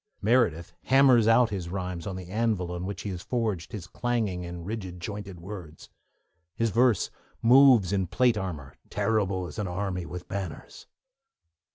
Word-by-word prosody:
Meredith 105 -8 +2
hammers 130 -4 +5
out 115 0 +5
his 90 -4 -4
rhymes 90 -2 -4
on 95 - -4
the 90 -1 -7
anvil 105 -3 -1
on 90 +1 -4
which 100 - -5
he 100 - -3
has 90 -2 -5
forged 105 -5 -2
his 105 -6 -6
clanging 110 -4 -2
and 85 -1 -7
rigid 95 -4 -5
jointed 100 0 -6
words. 85 -4 -9 0.7
His 115 -1 0
verse 120 -1 +3 0.3
moves 120 -6 +6
in 95 -2 0
plate 125 +4 +3
armour, 80 -10 -5 0.2
'terrible 100 -4 0
as 75 -4 -8
an 105 - -1
army 90 -1 -3
with 90 +1 -7
banners.' 95 -5 -6
95 Hz, 160 wpm, -27 LUFS, 90-115 Hz, 0.7 s, moves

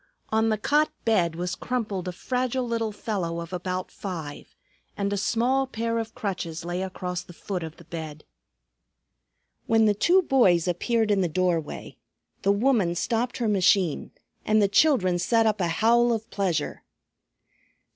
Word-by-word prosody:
On 220 +1 +2
the 215 - +1
cot 295 +8 +2 0.2
bed 175 -8 +2
was 180 +2 -3
crumpled 210 -5 -3
a - - -1
fragile 250 +5 -2
little 230 -2 -1
fellow 190 -6 -3
of 170 +2 -7
about 185 0 -3
five, 165 -7 -7 0.4
and 200 0 -1
a - - +1
small 245 +6 +1
pair 230 -2 -2
of 225 -1 -5
crutches 170 -5 -4
lay 175 +1 -2
across 180 -2 -4
the 175 - -13
foot 190 -3 -4
of 160 -1 -7
the 170 - -14
bed. 155 -2 -7 1.4
When 225 -1 +4
the 210 - +4
two 355 - +3
boys 185 - +3
appeared 220 +5 +1
in 200 -1 +3
the 180 - +2
doorway, 175 -2 -2 0.4
the 200 - +3
woman 200 -5 +2
stopped 235 +6 -1
her 235 - -1
machine 190 -4 +2 0.3
and 215 0 +3
the 205 - +4
children 200 - +3
set 225 +5 +2
up 215 -2 +1
a 175 - +2
howl 235 +8 +3
of 225 -1 -2
pleasure. 180 -7 -1
200 Hz, 160 wpm, -26 LUFS, 175-230 Hz, 1.4 s, When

